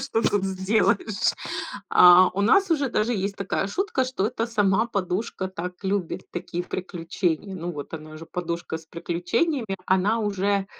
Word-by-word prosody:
что 270 Hz, -4 st, -1 dB
тут 205 Hz, -2 st, +2 dB
сделаешь? 195 Hz, +2 st, +1 dB, 0.6 s
А 180 Hz, +1 st, +8 dB
у 200 Hz, -, -2 dB
нас 370 Hz, -, +4 dB
уже 290 Hz, -4 st, +2 dB
даже 230 Hz, 0 st, 0 dB
есть 200 Hz, -2 st, -2 dB
такая 195 Hz, 0 st, -1 dB
шутка, 320 Hz, -, 0 dB
что 255 Hz, -6 st, -1 dB
это 230 Hz, 0 st, -2 dB
сама 210 Hz, -1 st, +2 dB
подушка 190 Hz, -2 st, -2 dB
так 180 Hz, -1 st, -5 dB
любит 190 Hz, -2 st, -1 dB
такие 175 Hz, 0 st, -4 dB
приключения. 180 Hz, 0 st, -3 dB
Ну, 175 Hz, -1 st, -4 dB
вот 145 Hz, -4 st, -7 dB
она 155 Hz, -1 st, -8 dB
же 160 Hz, -, -9 dB
подушка 170 Hz, -1 st, -4 dB
с 160 Hz, -, -17 dB
приключениями, 195 Hz, -, -1 dB
она 190 Hz, +5 st, +2 dB
уже, 200 Hz, -1 st, 0 dB
195 Hz, 155 wpm, -25 LUFS, 180-220 Hz, 0.6 s, А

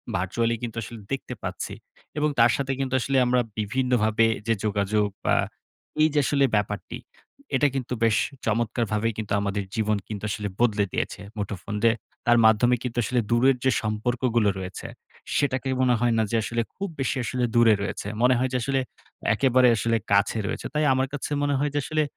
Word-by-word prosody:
virtually 115 Hz, +6 st, 0 dB
কিন্তু 115 Hz, -1 st, -5 dB
আসলে 115 Hz, +1 st, -9 dB
দেখতে 135 Hz, -, -3 dB
পাচ্ছি। -, -, -4 dB, 0.4 s
এবং 150 Hz, 0 st, +2 dB
তার 115 Hz, 0 st, +6 dB
সাথে 135 Hz, -1 st, -2 dB
কিন্তু 130 Hz, -1 st, -2 dB
আসলে 135 Hz, +2 st, 0 dB
আমরা 125 Hz, 0 st, +2 dB, 0.2 s
বিভিন্নভাবে 115 Hz, 0 st, +1 dB, 0.2 s
যে 115 Hz, -, +4 dB
যোগাযোগ 105 Hz, 0 st, +1 dB, 0.2 s
বা -, -, +3 dB, 0.7 s
এই 155 Hz, -, +6 dB
যে -, -, +5 dB
আসলে 140 Hz, 0 st, +3 dB
ব্যাপারটি, 105 Hz, -1 st, -2 dB, 0.6 s
এটা 145 Hz, -, +4 dB
কিন্তু 125 Hz, -2 st, -3 dB
বেশ 110 Hz, -2 st, +4 dB, 0.3 s
চমৎকারভাবেই 115 Hz, 0 st, 0 dB
কিন্তু 105 Hz, -2 st, -3 dB
আমাদের 100 Hz, 0 st, -2 dB
জীবন 110 Hz, -1 st, +1 dB
কিন্তু 105 Hz, -1 st, -6 dB
আসলে 105 Hz, 0 st, -3 dB
বদলে 105 Hz, -4 st, +3 dB
দিয়েছে -, -, -2 dB, 0.2 s
মুঠোফোন 100 Hz, 0 st, -4 dB
যে, 115 Hz, -, +6 dB, 0.3 s
তার 120 Hz, 0 st, +5 dB
মাধ্যমে 110 Hz, +3 st, +5 dB
কিন্তু 125 Hz, -2 st, -5 dB
আসলে 125 Hz, +3 st, 0 dB
দূরের 130 Hz, +3 st, +4 dB
যে 130 Hz, -, +4 dB
সম্পর্কগুলো 115 Hz, +1 st, +1 dB
রয়েছে, 95 Hz, 0 st, -6 dB, 0.5 s
সেটাকে 135 Hz, -2 st, 0 dB
মনে 125 Hz, -1 st, +4 dB
হয় 120 Hz, -1 st, +2 dB
না 110 Hz, -, +3 dB
যে -, -, 0 dB
আসলে 120 Hz, +1 st, -1 dB
খুব 200 Hz, +1 st, -3 dB
বেশি 135 Hz, -, 0 dB
আসলে 125 Hz, +1 st, -2 dB
দূরে 115 Hz, -2 st, +6 dB
রয়েছে। 100 Hz, -, -4 dB
মনে 125 Hz, +1 st, +5 dB
হয় 130 Hz, +1 st, +1 dB
যে -, -, +2 dB
আসলে, 135 Hz, +2 st, 0 dB, 0.5 s
একেবারে 130 Hz, +2 st, +4 dB
আসলে 115 Hz, +2 st, +1 dB
কাছে 100 Hz, +2 st, +3 dB
রয়েছে। -, -, -4 dB
তাই 150 Hz, 0 st, +1 dB
আমার 130 Hz, +1 st, +1 dB
কাছে 145 Hz, +1 st, -4 dB
মনে 145 Hz, -1 st, +1 dB
হয় 145 Hz, +1 st, +1 dB
যে 145 Hz, -, +1 dB
আসলে 155 Hz, +1 st, 0 dB
115 Hz, 180 wpm, -25 LUFS, 105-130 Hz, 0.7 s, তার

